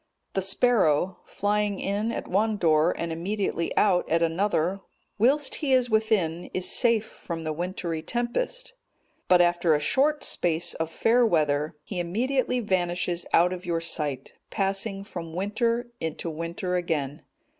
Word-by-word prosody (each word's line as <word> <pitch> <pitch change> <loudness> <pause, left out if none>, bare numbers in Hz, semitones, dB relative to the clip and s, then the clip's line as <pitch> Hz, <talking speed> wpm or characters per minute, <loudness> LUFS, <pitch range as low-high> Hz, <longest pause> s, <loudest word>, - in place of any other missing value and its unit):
The 195 - 0
sparrow, 190 -4 +2
flying 205 -1 0
in 205 +3 -1
at - - -5
one 210 +3 +1
door 160 -2 +3
and 170 0 -3
immediately 170 0 -2
out 190 -4 +3
at 165 +1 +2
another, 180 +1 0 0.4
whilst 270 +5 +3
he 280 -3 +1
is 250 -2 +3
within, 210 -7 +1
is 185 - -1
safe 230 -3 +3
from 165 -5 -7
the 155 -1 -2
wintry 170 -1 -3
tempest; 485 - -3 0.5
but 180 -1 +6
after 175 -2 +3
a - - +1
short 285 - +1
space 170 -1 +1
of 160 0 -3
fair 230 +9 +3
weather, 150 -7 +1
he 185 +1 -5
immediately 250 +8 0
vanishes 180 -4 -1
out 180 +2 +4
of 180 0 -7
your 170 -1 -1
sight, 150 -5 -2 0.2
passing 195 0 -2
from 170 -5 -7
winter 230 +5 -1
into 160 +1 -4
winter 170 +3 -4
again. 160 -4 -2
185 Hz, 145 wpm, -26 LUFS, 165-220 Hz, 0.5 s, but